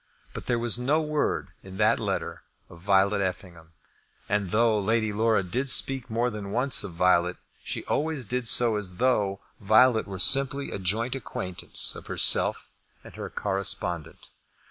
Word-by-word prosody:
But - - -9
there 120 - 0
was 120 0 0
no 140 +6 +1
word 150 -1 -2
in 95 0 -12
that 110 +2 +2
letter 100 -4 -4 0.3
of 85 - -14
Violet 100 +2 +1
Effingham; 90 -3 -6 0.6
and 105 -3 -1
though 110 +1 +1
Lady 110 +1 -1
Laura 110 -1 +1
did 125 +10 -2
speak 130 -1 +4
more 120 +2 -1
than 105 -2 -7
once 125 +6 +1
of 90 - -8
Violet, 90 0 +1 0.3
she - - -6
always 150 -4 -3
did 125 +3 -3
so 115 -1 +2
as 95 -3 -5
though 105 -6 0 0.2
Violet 110 +3 +3
were 95 -1 -7
simply 135 +8 +5
a - - -5
joint 110 +7 -2
acquaintance 95 -8 -2
of - - -11
herself - - +1 0.3
and - - -14
her - - -8
correspondent. 95 -4 -4
105 Hz, 160 wpm, -25 LUFS, 95-125 Hz, 0.6 s, simply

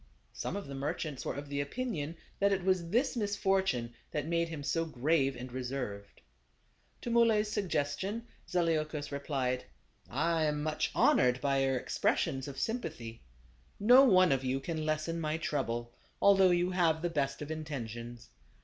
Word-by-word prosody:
Some - - -4
of 200 - -4
the 140 - -8
merchants 140 +1 -3
were - - -2
of 145 +1 -6
the 140 0 -2
opinion 165 - -3 0.2
that 200 0 +3
it 195 -2 0
was 185 -3 +1
this 250 +8 +1
misfortune 195 - 0 0.2
that 150 -1 -2
made 170 +1 0
him 155 -3 -6
so 165 +3 0
grave 140 -2 +1
and 125 +1 -7
reserved. 125 -6 -5 0.8
To 240 - -4
Muley's 225 -3 +3
suggestion 195 +2 -1 0.2
Zaleukos 155 -4 0
replied: 135 -3 -2 0.4
"I 160 +4 +1
am 150 -1 -1
much 155 0 0
honored 125 0 +4
by 140 0 +1
your 135 -1 +1
expressions 135 +1 0
of 140 -1 -7
sympathy. 150 - -4 0.6
No 245 +6 +8
one 185 - +6
of 135 -1 +1
you 130 +1 0
can 155 +2 -3
lessen 155 +2 -1
my 155 0 -1
trouble, 120 -7 -2 0.3
although 195 -2 +6
you 175 +1 +2
have 165 -3 +2
the 175 - +1
best 140 -2 -1
of 150 - -7
intentions. 120 -6 -6
155 Hz, 160 wpm, -32 LUFS, 135-185 Hz, 0.8 s, No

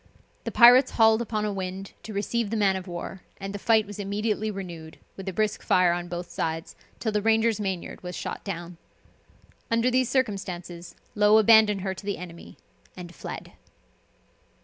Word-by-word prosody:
The - - -3
pirates 250 +2 +7
hauled 220 0 +5
upon 215 -2 -2
a 210 - -2
wind 190 0 -5
to 220 - -9
receive 210 +2 -1
the 225 - -2
man 195 -2 +3
of 190 0 -6
war, 175 +2 -6 0.2
and 195 0 -6
the 205 - -5
fight 220 0 +3
was 205 0 -9
immediately 210 +2 -1
renewed, 175 -6 -7 0.2
with 195 0 -6
a - - -3
brisk 215 +2 -1
fire 180 -1 +3
on 175 0 -4
both 175 0 -5
sides, 160 0 -3 0.2
till 220 - -1
the 210 0 0
Ranger's 225 0 +2
mainyard 190 -4 -4
was 180 -1 -6
shot - - -5
down. 175 -3 -6 0.9
Under 230 +2 +2
these 255 -1 +2
circumstances, 185 -8 -3 0.2
Low 210 +1 +5
abandoned 220 -2 +6
her 190 0 -2
to 190 - -11
the 200 - -1
enemy, 170 -1 -10 0.4
and 175 -1 -9
fled. - - -8
200 Hz, 175 wpm, -26 LUFS, 180-220 Hz, 0.9 s, pirates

